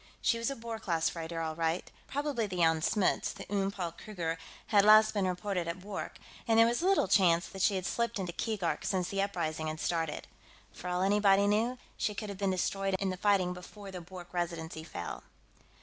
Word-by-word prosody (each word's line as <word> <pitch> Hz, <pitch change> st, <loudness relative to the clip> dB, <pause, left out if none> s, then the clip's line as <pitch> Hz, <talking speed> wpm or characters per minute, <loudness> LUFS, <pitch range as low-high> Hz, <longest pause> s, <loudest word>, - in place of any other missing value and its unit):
She 230 Hz, -, +2 dB
was 230 Hz, -, 0 dB
a 275 Hz, -, -3 dB
Boer 230 Hz, -1 st, -6 dB
class 165 Hz, -5 st, +1 dB
freighter, 165 Hz, 0 st, -4 dB
all 160 Hz, -1 st, -2 dB
right. 165 Hz, +1 st, -1 dB, 0.2 s
Probably 280 Hz, -6 st, -1 dB
the 185 Hz, -, -5 dB
Jan 165 Hz, -2 st, +3 dB
Smuts; 195 Hz, +3 st, +1 dB
the -, -, -9 dB
Oom 195 Hz, -1 st, +1 dB
Paul 185 Hz, -4 st, -4 dB
Kruger 165 Hz, -4 st, -4 dB, 0.3 s
had 205 Hz, -2 st, +5 dB
last 215 Hz, +1 st, +7 dB
been 200 Hz, -3 st, +1 dB
reported 180 Hz, -1 st, -2 dB
at 170 Hz, +2 st, -3 dB
Bwork, 200 Hz, +1 st, -5 dB, 0.3 s
and 225 Hz, -1 st, +4 dB
there 230 Hz, -, +8 dB
was 240 Hz, +5 st, +1 dB
little 380 Hz, -, +3 dB
chance 180 Hz, -3 st, +4 dB
that 195 Hz, -, -6 dB
she 195 Hz, +1 st, +4 dB
had 185 Hz, -1 st, -2 dB
slipped 235 Hz, +2 st, -1 dB
into 180 Hz, -3 st, -3 dB
Keegark 200 Hz, -4 st, -1 dB
since 185 Hz, -3 st, 0 dB
the 195 Hz, 0 st, 0 dB
uprising 160 Hz, -5 st, -2 dB
had 155 Hz, 0 st, -4 dB
started. 165 Hz, -3 st, -1 dB, 0.5 s
For 180 Hz, -, -8 dB
all 180 Hz, +1 st, 0 dB
anybody 200 Hz, 0 st, +4 dB
knew, 225 Hz, +5 st, +2 dB, 0.2 s
she 210 Hz, -, -1 dB
could 210 Hz, 0 st, -4 dB
have 200 Hz, -1 st, -7 dB
been 200 Hz, -1 st, +1 dB
destroyed 195 Hz, +1 st, 0 dB
in 195 Hz, 0 st, -1 dB
the -, -, -3 dB
fighting 185 Hz, -1 st, +2 dB
before 195 Hz, +2 st, -10 dB
the 180 Hz, -1 st, -6 dB
Bwork 180 Hz, 0 st, -11 dB
Residency 165 Hz, -2 st, -3 dB
fell. 85 Hz, -, -6 dB
190 Hz, 210 wpm, -31 LUFS, 170-210 Hz, 0.5 s, there